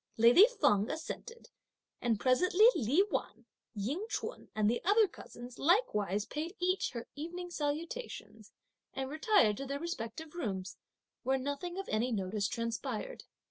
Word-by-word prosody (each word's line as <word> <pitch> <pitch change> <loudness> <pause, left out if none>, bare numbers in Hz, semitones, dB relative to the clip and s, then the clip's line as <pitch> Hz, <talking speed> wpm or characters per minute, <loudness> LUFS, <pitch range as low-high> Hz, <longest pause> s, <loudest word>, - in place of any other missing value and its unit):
Lady 240 - +8
Feng 205 +1 +3
assented, 465 +9 -6 0.5
and 230 -4 +1
presently 360 - +4
Li 270 - +3
Wan, - - -3 0.3
Ying 275 - -2
Ch'un - - -5
and 215 -1 +2
the 235 +3 0
other 415 +3 +5
cousins, 245 -7 -11
likewise 210 - +2
paid 320 - -5
each 365 +2 +1
her 235 -1 -6
evening 350 +4 -6
salutation 330 +11 -4 0.5
and 265 0 -3
retired 310 - +3
to 275 - -5
their 280 +1 -3
respective 315 -2 -5
rooms, 190 - -4 0.5
where 265 +2 +1
nothing 285 +7 -4
of 390 - -4
any 230 +4 0
notice 200 -1 -1
transpired. 230 - -4
280 Hz, 140 wpm, -33 LUFS, 225-355 Hz, 0.5 s, Lady